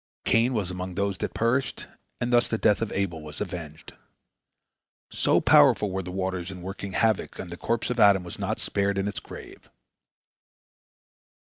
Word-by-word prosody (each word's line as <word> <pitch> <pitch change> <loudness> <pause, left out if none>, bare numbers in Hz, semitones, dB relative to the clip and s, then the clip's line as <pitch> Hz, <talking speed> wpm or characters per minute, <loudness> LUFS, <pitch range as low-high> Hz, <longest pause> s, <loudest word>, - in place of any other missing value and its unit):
Cain 120 +3 +3
was 100 -5 -1
among 90 0 -5
those 100 -1 -1
that - - -4
perished, 125 +4 0 0.3
and 120 +1 -1
thus 120 0 +4
the 110 - -1
death 105 -2 +2
of 115 - -2
Abel 90 -5 -2
was 75 -1 -9
avenged. 85 -6 -7 1.2
So - - +3
powerful 105 -2 +5
were 95 +1 -2
the 90 - -8
waters 95 -1 -3
in 90 -2 -8
working 95 +1 -6
havoc 110 -1 +1
that 90 - -8
the - - -5
corpse 115 +6 -2
of 125 - -2
Adam 100 -3 +6
was 85 - -8
not - - -2
spared 100 0 -1
in 100 +1 0
its 100 - -4
grave. - - -12
100 Hz, 175 wpm, -26 LUFS, 90-110 Hz, 1.2 s, Adam